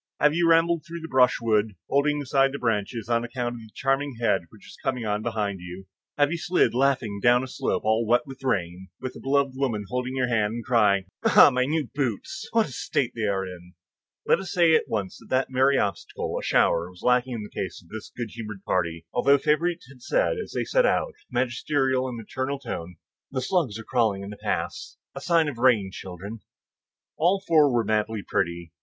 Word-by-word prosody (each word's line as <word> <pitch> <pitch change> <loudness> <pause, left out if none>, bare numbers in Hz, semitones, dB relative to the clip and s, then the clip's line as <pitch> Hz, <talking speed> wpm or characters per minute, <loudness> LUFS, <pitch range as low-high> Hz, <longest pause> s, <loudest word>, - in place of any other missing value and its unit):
Have 150 0 +4
you 170 0 +2
rambled 165 0 +3
through 170 0 -8
the 160 - -6
brushwood, 115 -6 +2
holding 145 +1 +1
aside 135 0 +2
the - - -3
branches, 115 -2 -2
on 115 0 +1
account 120 0 -3
of 120 - -8
the 110 - -13
charming 135 +1 0
head 95 -7 +1
which 110 - -17
is - - -12
coming 125 -3 -1
on 105 0 -1
behind 105 -4 -2
you? 90 +2 -9 0.3
Have 145 0 +3
you 170 - -2
slid, 175 -4 +2
laughing, 125 -5 +1
down 120 +2 +4
a - - -5
slope 130 - -2
all 110 +1 +3
wet 120 +1 +3
with 135 -1 -11
rain, 95 -6 -2
with 130 -1 -6
a - - -9
beloved 140 0 +1
woman 125 -6 -2
holding 125 +1 -2
your 130 -1 +1
hand, 110 -3 +1
and 120 - -6
crying, 105 -5 +3 0.2
"Ah, - - +7
my 125 0 +2
new 150 0 -1
boots! 130 -7 -3
what 225 -1 +3
a - - -10
state 125 0 -1
they 110 -2 -1
are 95 -1 0
in!" 90 -1 -11 0.5
Let - - +4
us 190 - -6
say 170 -3 +4
at - - +3
once 100 -4 -3
that - - -16
that 130 0 +1
merry 135 +2 +3
obstacle, 100 - -2
a - - -2
shower, 85 +1 +2
was 90 -1 -16
lacking 125 0 +2
in 110 - -5
the 105 - -9
case 95 - -5
of 85 - -21
this 110 -1 -8
good 120 -3 -4
humored 105 -4 -8
party, 85 -2 -1
although 140 +3 +4
Favourite 165 +5 +1
had 130 -2 -16
said - - +1
as 440 - -6
they - - -1
set - - +3
out, - - +1
with - - -18 0.2
a - - -9
magisterial 130 +1 0
and 125 -2 -5
maternal 130 +5 -3
tone, 90 -9 -6 0.3
"The 130 - -2
slugs 130 - 0
are 115 - -8
crawling 110 -5 0
in 100 - -7
the 105 - -9
paths,—a - - -5
sign 165 -2 +3
of 135 -5 -5
rain, 115 -7 +3
children." 95 +5 -8 0.8
All 180 +5 +3
four 155 -4 +5
were 120 -2 +2
madly 110 -1 -1
pretty. 85 -1 -2
125 Hz, 215 wpm, -25 LUFS, 105-140 Hz, 0.8 s, Ah